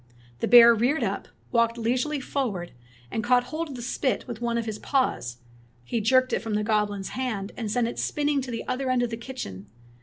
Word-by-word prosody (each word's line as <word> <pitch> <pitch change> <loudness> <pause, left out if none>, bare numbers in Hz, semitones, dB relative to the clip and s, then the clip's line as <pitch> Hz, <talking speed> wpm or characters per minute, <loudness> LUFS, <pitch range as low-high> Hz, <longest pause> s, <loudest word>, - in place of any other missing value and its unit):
The - - 0
bear 235 -1 +9
reared 245 +8 +1
up, - - -2 0.2
walked 230 -1 +2
leisurely 250 +6 0
forward, 225 -11 -3 0.4
and 225 - -2
caught 245 +1 +4
hold 315 +4 -4
of 275 - -7
the 240 - -6
spit 260 +1 -1
with 240 -2 -6
one 235 -1 0
of 230 - -1
his 215 -2 -4
paws. 255 - 0 0.5
He 225 - -2
jerked 255 +4 +3
it - - +2
from 225 -2 -3
the 210 - +1
goblin's 205 -2 0
hand, 225 -6 -3
and 225 -3 -4
sent 235 +2 +1
it 235 - -5
spinning 290 -1 0
to 260 - -6
the 230 -1 -5
other 255 +1 -1
end 255 -1 +2
of 240 - -2
the - - -2
kitchen. 225 - -7
235 Hz, 215 wpm, -26 LUFS, 220-255 Hz, 0.5 s, bear